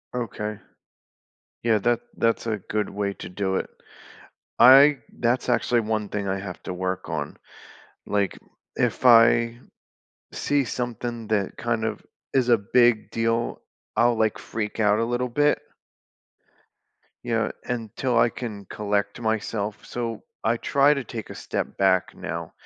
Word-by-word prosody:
Okay. 105 -3 -4 1.0
Yeah, 115 -2 +3
that 120 +3 +1 0.2
that's 115 0 +1
a 110 -2 -1
good 105 +2 -3
way 100 0 -2
to - - -8
do 95 +1 -2
it. - - -3 0.9
I 135 +3 +8 0.2
that's 120 +1 +1
actually 120 -1 +2
one 110 -1 -2
thing 100 -1 -3
I 95 +1 -1
have 95 -3 -7
to 90 - -4
work 95 0 -3
on. 75 -3 -4 0.7
Like, 100 -1 0 0.4
if - - 0
I 115 0 +6 0.7
see 145 -1 +1
something 120 -2 -4
that, 105 -3 0
kind 120 -2 -1
of 110 - -3 0.3
is 130 -2 +3
a 120 -2 +5
big 115 +2 +3
deal, 115 +1 0 0.4
I'll, 120 0 +4
like, 110 -1 +1
freak 110 -2 -5
out 105 0 +3
a - - +2
little 120 +2 -1
bit 145 +4 +2 1.6
yeah, 115 -2 0
until 120 +1 -1
I 115 - +5
can 110 -5 -7
collect 100 +2 -2
myself, 110 -2 -2
so 115 -2 -4 0.2
I 115 +1 +2
try 140 +4 +3
to 140 -3 -4
take 110 -1 -7
a - - -8
step - - -4
back 95 -2 +2
now - - -6
115 Hz, 145 wpm, -25 LUFS, 105-120 Hz, 1.6 s, I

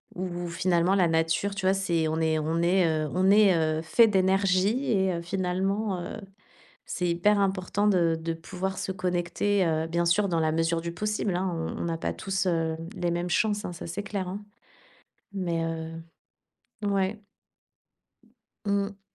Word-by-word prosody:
où 175 -1 -4
finalement, 175 +2 +2
la 180 -3 +4
nature, 165 +5 +1
tu 190 -1 -1
vois, 190 - +5
c'est 170 -4 0
on 160 +1 -1
est 160 -1 +1
on 160 +2 -1
est, 180 0 +3
heu, 155 -2 0
on 185 +1 +3
est, 205 -3 +6
heu, 155 -1 +1
fait 225 +8 +5
d'énergie 195 +5 +2
et 190 -3 +2
heu, 170 - -3
finalement, 190 +2 -1
heu, 185 +5 -6 0.7
c'est 180 - -2
hyper 200 +5 +3
important 195 +1 0
de 170 -5 +3
de 165 0 -3
pouvoir 185 +3 -5
se - - -3
connecter, 185 +2 0
heu, 160 0 0
bien 170 +1 0
sûr, 200 +4 +3
dans 170 -2 +1
la 155 -1 +1
mesure 165 +1 0
du 170 - -4
possible 210 0 -1
hein, 185 +1 -1
on 165 0 -4
on - - -2
n'a 165 -1 -2
pas - - -2
tous, 195 -1 -2
heu, 165 -2 0 0.2
les 175 -1 0
mêmes 175 +1 -2
chances 210 +3 +1
hein, - - -4
ça, 170 - -8
c'est 195 +5 -4
clair 195 -3 -3
hein, 200 +3 -6 0.9
mais, 170 -3 -1
heu, 165 0 -5 0.9
ouais 200 +2 -1 1.4
Mmh. 200 0 -1
180 Hz, 175 wpm, -27 LUFS, 165-195 Hz, 1.4 s, est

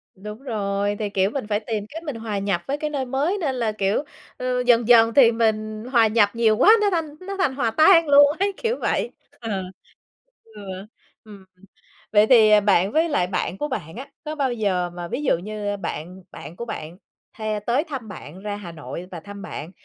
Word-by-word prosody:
Đúng 210 +4 -9
rồi, 205 -4 -1
thì, 210 -1 -2
kiểu, 195 0 +1
mình 260 -3 -5
phải 210 -1 0
tìm 215 -2 -4
cách 325 +3 -8
mình 290 -6 -5
hòa 220 -3 -4
nhập 195 -3 -1
với 280 - -1
cái 300 0 -3
nơi 275 -3 -2
mới, 280 +10 -1
nên 290 -8 -2
là, 230 -3 -1
kiểu, 205 +5 0 0.3
ờ, 250 - -6 0.2
dần 240 -2 +4
dần 230 -1 +6
thì 240 -3 +6
mình 215 -1 -1
hòa 230 -4 +5
nhập 215 -2 +3
nhiều 225 -2 +2
quá, 425 - +6
nó 410 - +3
thành 315 -4 -2
nó 395 +1 -6
thành 290 -9 0
hòa 240 -5 0
tan 330 - +5
luôn 285 0 +7
ấy, 400 +1 +1
kiểu 470 +1 -1
vậy. 475 - -1 0.3
Ờ, 210 -5 -3 0.8
ừ, 220 -2 -14 0.6
ừm. 200 -3 -14 0.7
Vậy 210 0 +5
thì, 225 -4 +6
à, 210 - +7
bạn 200 -1 +2
với 320 +3 +2
lại 180 -12 +1
bạn 185 0 -3
của 295 - -2
bạn 195 - -5
á, 265 +4 -8 0.2
có 305 +1 -4
bao 270 -4 0
giờ 190 -6 -1
mà 175 0 -7
ví 290 +11 -4
dụ 255 - +2
như 205 +2 -4
bạn 180 0 -6
bạn 165 - -10
của 235 - -6
bạn 170 -6 -7 0.4
hay 215 -1 -3
tới 240 +7 0
thăm 270 -9 -7
bạn, 175 -2 -10
ra 205 0 -4
Hà 185 -5 -8
Nội 170 +3 -8
và 175 - -6
thăm 200 +4 -10
bạn, 160 -2 -7
220 Hz, 215 wpm, -23 LUFS, 200-270 Hz, 0.8 s, luôn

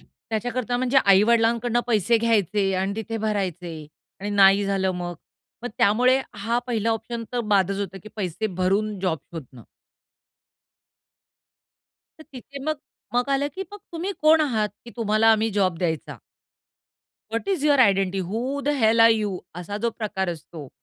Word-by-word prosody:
त्याच्याकरता 245 +2 -4
म्हणजे 255 +2 0
"आई-वडिलांकडून 230 +4 +3
पैसे 230 0 +2
घ्यायचे 210 -3 +1
आणि 190 +1 -1
तिथे 225 +1 -4
भरायचे 180 -6 -3 0.3
आणि 205 +1 -4
नाही 200 0 +5
झालं 195 -1 0
मग?" 175 -1 -4 0.5
मग 245 - -3
त्यामुळे 250 +6 +4
हा 225 +4 -1
पहिला 230 -2 0
ऑप्शन 230 +1 -3
तर 245 - 0
बादच 195 0 +2
होता 195 -1 -5
की - - -10
पैसे 190 +1 -2
भरून 195 +2 -1
जॉब 180 -4 0
शोधणं. 130 -7 -9 2.6
तर 315 - -13
तिथे 275 +2 -10
मग 310 0 -1 0.4
मग 245 +2 +1
आलं 275 +1 +1
की 385 - -4
"मग 410 - -8
तुम्ही 345 +4 -3
कोण 315 +1 +6
आहात 225 -8 +1 0.2
की 235 - -10
तुम्हाला 220 +1 +3
आम्ही 220 +1 +1
जॉब 185 -4 +1
द्यायचा?" 160 -4 -3 1.1
"What 230 - -3
is 365 -7 0
your 290 -2 +4
identity? 195 -4 +3
Wu 235 +10 -3
the - - +2
hell 225 +1 +4
are 225 0 +8
you?" 210 -4 0 0.2
असा 200 +4 -5
जो 235 - +2
प्रकार 195 -4 -2
असतो. 160 -3 -9
215 Hz, 155 wpm, -24 LUFS, 190-240 Hz, 2.6 s, are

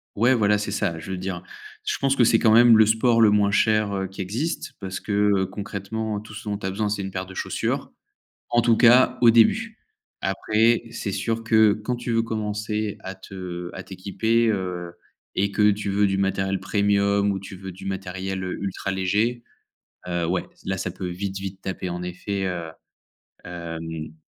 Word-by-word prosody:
ouais, 120 +5 +4
voilà, 105 -2 +3
c'est 105 -1 -3
ça. 95 -5 -1
Je 95 - -7
veux 95 - -3
dire, 95 -1 -4 0.4
je - - -1
pense 135 0 +1
que 120 - +5
c'est 115 0 +5
quand 110 - +4
même 120 -1 +8
le 110 - +7
sport 115 +2 +3
le 110 - +7
moins 100 -1 +3
cher, 110 0 +2
heu, 95 0 -2
qui 95 - -15
existe 120 - -3
parce 95 -1 -4
que, - - -6 0.3
heu, 95 - +1
concrètement 105 +2 -4
tout 110 +1 -12
ce 110 0 -7
dont 100 - -1
tu 100 - -8
as - - -1
besoin 105 +2 -1
c'est 100 -1 -2
une 95 - -5
paire 95 0 -4
de 95 - -11
chaussures. - - -2 0.6
En 120 - +3
tout 120 -1 +4
cas 125 +1 +6
au 120 - +8
début. 215 - +3 0.4
Après 115 +2 +2
c'est 110 -3 -4
sûr 115 +3 -2
que 110 -2 +5
quand 110 +4 -3
tu 120 0 -4
veux 115 0 +2
commencer 105 -1 -3
à 95 +1 -6
te 90 -2 -7
à - - -7
t'équiper, 110 +5 0
heu 90 -4 -3 0.4
et 100 +1 +1
que 105 +1 +4
tu 100 0 -3
veux 100 +1 +3
du 95 - 0
matériel 95 0 0
premium 100 +1 +2
ou 95 - -2
tu 95 0 -9
veux 95 0 -8
du 90 - -11
matériel 95 0 -4
ultra 95 +1 -3
léger, 105 +6 0 0.7
heu, 85 -1 -1
ouais, 90 +2 -1 0.2
là, 95 0 -1
ça 95 - -3
peut 90 +1 -5
vite, 95 +2 -4
vite 95 0 -6
taper 95 -1 -4
en 90 0 -4
effet, 95 +2 -3
heu, 85 -3 -3 0.8
hem 80 -2 -6
100 Hz, 200 wpm, -24 LUFS, 95-110 Hz, 0.8 s, même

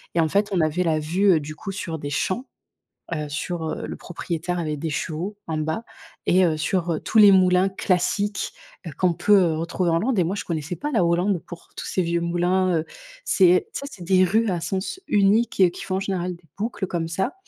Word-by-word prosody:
et - - +3
en 160 - +1
fait 205 +4 +1
on 175 - +2
avait 160 +4 +1
la 160 -2 +1
vue, 180 +5 +3
heu, - - +2
du 155 +1 -7
coup 195 +4 -6
sur 165 -5 -4
des 145 - -5
champs, 190 - -2 0.7
heu, 150 -1 -3
sur, 160 +3 -4
heu, - - -4
le - - -6
propriétaire 175 0 -4
avait 155 -3 -2
des 160 +2 -3
chevaux, 170 +7 -3
en 160 -1 -2
bas 160 +9 -2 0.4
et, 185 +1 +4
heu, 155 -2 0
sur, 175 +2 0
heu, 155 - -2
tous 220 - 0
les 205 -2 +9
moulins 185 0 +4
classiques, 195 +2 -1 0.3
heu, - - -4
qu'on 180 -2 +3
peut 180 -2 +4
retrouver 170 +2 -1
en 165 - +2
Hollande. 230 +2 0
Et 175 - +4
moi, 190 +5 -2
je - - -4
connaissais 160 0 -3
pas 295 +1 -3
la 215 -7 +3
Hollande 175 +3 +2
pour 170 -1 -11
tous - - -5
ces 185 - 0
vieux 170 0 0
moulins, 175 +1 +1
heu. 155 - -2 0.4
C'est 185 - +4
tu - - -3
sais? 280 - -6
C'est 180 - -10
des 185 +1 +4
rues 220 +5 +2
à 175 -2 -1
sens 190 - -3
unique 200 -2 +3
qui - - -8
font 185 - -2
en - - -1
général 185 -2 -2
des 170 - -25
boucles 210 -3 -2
comme 165 -2 -3
ça 190 - -2
180 Hz, 230 wpm, -23 LUFS, 165-195 Hz, 0.7 s, les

